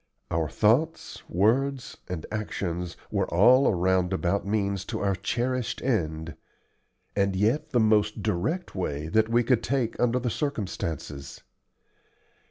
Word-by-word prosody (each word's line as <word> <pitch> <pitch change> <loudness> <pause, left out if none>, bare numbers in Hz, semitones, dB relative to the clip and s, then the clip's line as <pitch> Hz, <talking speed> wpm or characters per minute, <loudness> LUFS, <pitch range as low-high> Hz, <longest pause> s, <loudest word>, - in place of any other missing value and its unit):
Our 80 -2 0
thoughts, 150 - +1
words, 125 +8 +1
and 85 -4 -4
actions 90 -5 -3
were - - -1
all 125 +10 +6
a - - +3
roundabout 95 +1 +1
means 100 -2 0
to - - -4
our 100 -1 +1
cherished 120 +6 -2
end, 80 - -1 0.8
and 100 -1 +1
yet 110 +10 +1
the 120 - +2
most 105 -1 +2
direct 155 - -1
way 80 -5 -3
that 110 +5 +2
we 120 +1 +3
could 120 -1 +2
take 120 -2 -1
under 125 0 +2
the 125 -2 -1
circumstances. 85 - -4
105 Hz, 130 wpm, -27 LUFS, 90-120 Hz, 0.8 s, all